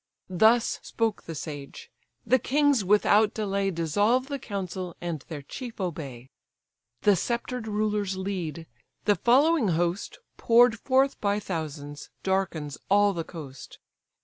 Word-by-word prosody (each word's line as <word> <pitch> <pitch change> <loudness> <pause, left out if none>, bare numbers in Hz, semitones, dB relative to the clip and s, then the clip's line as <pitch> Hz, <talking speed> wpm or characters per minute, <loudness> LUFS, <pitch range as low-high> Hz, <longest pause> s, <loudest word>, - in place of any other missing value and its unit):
Thus 220 +6 +3
spoke 225 -2 -2
the 165 - -6
sage: 145 -2 -8 0.3
the 260 - +4
kings 285 -4 +2
without 210 +2 +4
delay 200 -2 0
Dissolve 205 - +1
the 280 -1 -3
council, 185 -5 -5
and 170 -5 -4
their 150 -4 -6
chief 240 - -8
obey: 140 -9 -5 0.7
The 205 - +5
sceptred 235 +4 -3
rulers 210 -2 -1
lead; 180 -5 -4 0.4
the 205 - +4
following 270 - +4
host, 175 +2 -1 0.2
Pour'd 235 -1 +5
forth 270 +1 +2
by 205 0 +1
thousands, 150 -6 -6
darkens 175 -7 -1
all 205 0 +4
the 170 -2 -3
coast. 145 -6 -10
200 Hz, 125 wpm, -27 LUFS, 165-225 Hz, 0.7 s, The